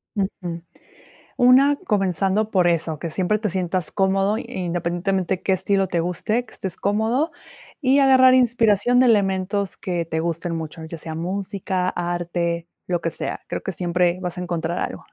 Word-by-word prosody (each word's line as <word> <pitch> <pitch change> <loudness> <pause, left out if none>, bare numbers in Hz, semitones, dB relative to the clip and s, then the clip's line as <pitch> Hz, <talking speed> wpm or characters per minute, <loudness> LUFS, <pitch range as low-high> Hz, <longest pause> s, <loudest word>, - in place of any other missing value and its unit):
Ujú. 180 -4 -3 0.8
Una, 265 +4 +5
comenzando 200 - 0
por 180 -3 +3
eso, 160 -2 0
que 165 - -4
siempre 190 +6 0
te 210 -1 -1
sientas 180 -1 -1
cómodo, 195 +2 +1
i - - -5
independientemente 180 -2 -2
qué 190 - +1
estilo 195 +1 +1
te 170 -1 -1
guste, 215 +8 -1
que - - -16
estés 190 -2 -4
cómodo, 225 +10 0 0.5
y 270 +1 +4
agarrar 260 -1 +6
inspiración 240 -1 +3
de 255 - +5
elementos 195 -2 +1
que 175 -2 -2
te 160 0 -2
gusten 170 +1 -2
mucho, 160 0 -6
ya 165 +1 -7
sea 160 0 -6
música, 185 +1 -2
arte, 175 -1 -2 0.2
lo 175 -2 -1
que 165 - -1
sea. - - -4
Creo - - -4
que 190 - -4
siempre 175 +1 +1
vas 180 -1 -4
a - - -3
encontrar 170 -1 -2
algo. - - -5
185 Hz, 165 wpm, -22 LUFS, 170-210 Hz, 0.8 s, agarrar